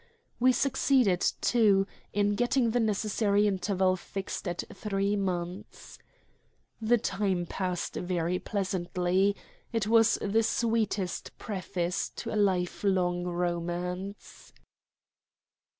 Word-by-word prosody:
We 255 +1 +5
succeeded, 255 -7 +2 0.2
too, 205 -5 +4 0.3
in 205 0 +2
getting 245 +1 +2
the 245 - +1
necessary 210 -1 +1
interval 190 -1 +1
fixed 195 +1 -5
at 175 -1 -2
three 200 -1 -1
months. 185 0 -4 0.8
The 230 +2 +4
time 190 -4 -1
passed 180 0 -3
very 180 0 -1
pleasantly. 185 0 0 0.4
It 225 -3 0
was 225 +1 +4
the 210 +2 +2
sweet 225 -1 +1 0.4
preface 185 -4 -3
to - - -5
a - - -2
life 190 -4 +1
long 180 -3 +1
romance. 175 +2 -4
195 Hz, 105 wpm, -29 LUFS, 180-215 Hz, 0.8 s, We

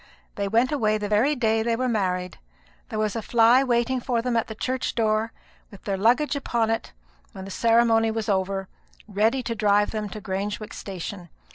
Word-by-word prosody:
They 200 -1 -2
went 230 +6 +2
away 215 -7 +1
the 210 -1 -3
very 225 +9 +2
day 225 -3 +1
they 230 +1 0
were 255 +2 -1
married. 185 -5 -1 0.5
There 220 - -4
was 215 0 -1
a 225 - -2
fly 235 +4 +4
waiting 250 0 +1
for 245 -1 -1
them 240 +1 -1
at 230 - +1
the 220 - -7
church 255 +3 -2
door, 220 0 +1 0.4
with 200 - -14
their 200 - -1
luggage 245 +10 +2
upon 235 -5 0
it, 225 - -3 0.4
when 190 - -8
the 195 - -8
ceremony 230 0 +3
was 220 -1 -3
over, 195 -1 -1 0.4
ready 220 +5 +1
to 230 - -2
drive 205 -2 +2
them 215 -2 -3
to 215 - -7
Grangewick 205 +2 -4
station. 185 -1 -7
220 Hz, 190 wpm, -24 LUFS, 205-235 Hz, 0.5 s, fly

